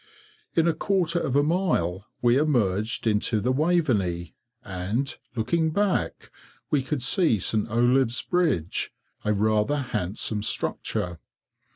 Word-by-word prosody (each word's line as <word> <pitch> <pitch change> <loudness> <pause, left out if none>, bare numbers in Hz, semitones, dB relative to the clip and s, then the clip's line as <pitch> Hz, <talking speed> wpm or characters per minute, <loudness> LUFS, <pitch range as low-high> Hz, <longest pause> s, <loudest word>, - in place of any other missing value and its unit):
In 165 0 +3
a 170 - +3
quarter 175 -1 0
of 135 - -2
a 145 - +4
mile 125 - 0 0.2
we 120 0 +4
emerged 115 -8 +1
into 110 0 +1
the 125 +5 0
Waveney, 130 - 0 0.3
and, 100 +8 -3 0.2
looking 160 +8 +1
back, 200 +4 -1 0.4
we 145 - +3
could 135 0 -3
see 145 - +4
St. 105 +3 0
Olave's 120 +2 +2
bridge, 155 - 0 0.3
a 105 - +1
rather 110 +6 +1
handsome 105 -4 -2
structure. 90 -4 -1
120 Hz, 125 wpm, -25 LUFS, 105-155 Hz, 0.4 s, a